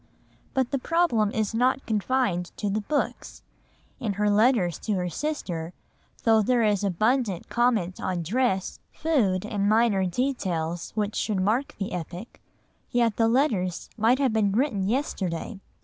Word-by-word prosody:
But 260 Hz, -1 st, +1 dB
the 275 Hz, -, 0 dB
problem 255 Hz, -9 st, +2 dB
is 220 Hz, -1 st, -1 dB
not 255 Hz, +3 st, +1 dB
confined 210 Hz, -5 st, 0 dB
to 205 Hz, -, -1 dB
the 215 Hz, +2 st, 0 dB
books; 290 Hz, +7 st, -3 dB, 0.6 s
in 220 Hz, -6 st, -2 dB
her 205 Hz, +1 st, +1 dB
letters 205 Hz, -, +3 dB
to 215 Hz, -, -2 dB
her 180 Hz, -1 st, -1 dB
sister, 175 Hz, -, -3 dB, 0.5 s
though 225 Hz, -1 st, +5 dB
there 240 Hz, +2 st, +2 dB
is 210 Hz, -2 st, +2 dB
abundant 210 Hz, +1 st, 0 dB
comment 230 Hz, -7 st, +1 dB
on 180 Hz, -2 st, -2 dB
dress, 195 Hz, 0 st, 0 dB
food, 215 Hz, -, +1 dB
and 205 Hz, -1 st, 0 dB
minor 215 Hz, -4 st, +3 dB
details 175 Hz, -7 st, -2 dB
which 210 Hz, -1 st, -1 dB
should 210 Hz, -3 st, -1 dB
mark 220 Hz, +9 st, 0 dB
the 195 Hz, -, -4 dB
epoch, 180 Hz, +5 st, -7 dB, 0.5 s
yet 235 Hz, -3 st, +1 dB
the 225 Hz, -, +3 dB
letters 225 Hz, -, 0 dB
might 230 Hz, +4 st, +3 dB
have 265 Hz, -4 st, +1 dB
been 210 Hz, -3 st, +2 dB
written 210 Hz, -4 st, 0 dB
yesterday. 200 Hz, -, -2 dB
215 Hz, 150 wpm, -26 LUFS, 190-245 Hz, 0.6 s, though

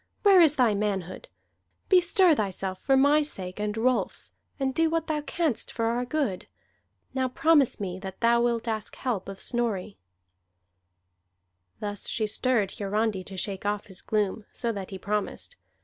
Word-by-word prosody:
Where 390 Hz, -3 st, +7 dB
is 310 Hz, -3 st, +5 dB
thy 245 Hz, -6 st, +3 dB
manhood? 195 Hz, -3 st, -3 dB, 0.6 s
Bestir 365 Hz, -1 st, +5 dB
thyself 190 Hz, -5 st, -3 dB
for 270 Hz, -1 st, +3 dB
my 285 Hz, +3 st, +5 dB
sake 190 Hz, -11 st, -4 dB
and 210 Hz, +1 st, -2 dB
Rolfs, 250 Hz, +2 st, 0 dB, 0.3 s
and 265 Hz, -1 st, 0 dB
do 325 Hz, +2 st, +2 dB
what 330 Hz, 0 st, 0 dB
thou 305 Hz, -2 st, -1 dB
canst 305 Hz, -4 st, -2 dB
for 230 Hz, -, -2 dB
our 240 Hz, +2 st, 0 dB
good! 250 Hz, -9 st, -2 dB, 0.7 s
Now 260 Hz, -1 st, 0 dB
promise 295 Hz, 0 st, +3 dB
me 185 Hz, -2 st, -4 dB
that 190 Hz, -1 st, -8 dB
thou 235 Hz, 0 st, +4 dB
wilt 235 Hz, -1 st, 0 dB
ask 220 Hz, -2 st, -3 dB
help 225 Hz, -8 st, -3 dB
of 195 Hz, -1 st, -8 dB
Snorri." 220 Hz, -5 st, -2 dB, 1.8 s
Thus 205 Hz, -1 st, -3 dB
she 220 Hz, -, 0 dB
stirred 215 Hz, -1 st, 0 dB
Hiarandi 205 Hz, -1 st, 0 dB
to 195 Hz, -, -8 dB
shake 190 Hz, +1 st, -3 dB
off 205 Hz, 0 st, -1 dB
his 190 Hz, -2 st, -10 dB
gloom, 210 Hz, 0 st, -1 dB
so 235 Hz, -, 0 dB
that 200 Hz, -4 st, -6 dB
he 190 Hz, -, -6 dB
promised. 210 Hz, -, -3 dB
225 Hz, 160 wpm, -27 LUFS, 200-270 Hz, 1.8 s, Where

